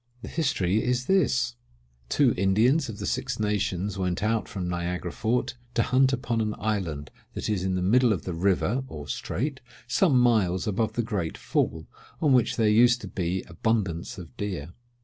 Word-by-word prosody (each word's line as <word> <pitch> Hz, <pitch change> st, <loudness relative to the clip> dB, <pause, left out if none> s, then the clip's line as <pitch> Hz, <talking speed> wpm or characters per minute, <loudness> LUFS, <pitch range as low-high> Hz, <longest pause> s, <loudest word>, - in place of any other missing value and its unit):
The -, -, -6 dB
history 110 Hz, -, +1 dB
is 125 Hz, 0 st, 0 dB
this:—Two 120 Hz, -, 0 dB
Indians 110 Hz, -, +3 dB
of 105 Hz, -, -6 dB
the -, -, -5 dB
Six -, -, -2 dB
Nations 100 Hz, -2 st, -1 dB
went 90 Hz, 0 st, -1 dB
out 110 Hz, +1 st, 0 dB
from 90 Hz, -3 st, -4 dB
Niagara 90 Hz, 0 st, -3 dB
Fort 120 Hz, +7 st, -1 dB, 0.2 s
to 115 Hz, -, +3 dB
hunt 130 Hz, +2 st, +3 dB
upon 120 Hz, -3 st, -1 dB
an 105 Hz, -1 st, -1 dB
island 90 Hz, -9 st, -2 dB, 0.2 s
that -, -, -3 dB
is 105 Hz, -4 st, 0 dB
in 95 Hz, -1 st, 0 dB
the 90 Hz, -, -1 dB
middle 120 Hz, +5 st, +4 dB
of 100 Hz, -, -1 dB
the 90 Hz, -, -4 dB
river, 100 Hz, +8 st, +1 dB
or 75 Hz, -, -8 dB
strait, 130 Hz, -, -3 dB, 0.3 s
some 135 Hz, +2 st, +3 dB
miles 105 Hz, -7 st, +2 dB
above 110 Hz, +1 st, 0 dB
the 120 Hz, -, 0 dB
great 100 Hz, -8 st, -3 dB
Fall, 80 Hz, -1 st, -1 dB, 0.3 s
on 150 Hz, -4 st, +3 dB
which 125 Hz, -3 st, +3 dB
there 110 Hz, -2 st, +2 dB
used 120 Hz, +3 st, +5 dB
to 105 Hz, -, -7 dB
be 90 Hz, 0 st, -2 dB
abundance 95 Hz, -2 st, -2 dB
of 90 Hz, -4 st, -10 dB
deer. 90 Hz, -6 st, -4 dB
105 Hz, 175 wpm, -26 LUFS, 90-120 Hz, 0.3 s, used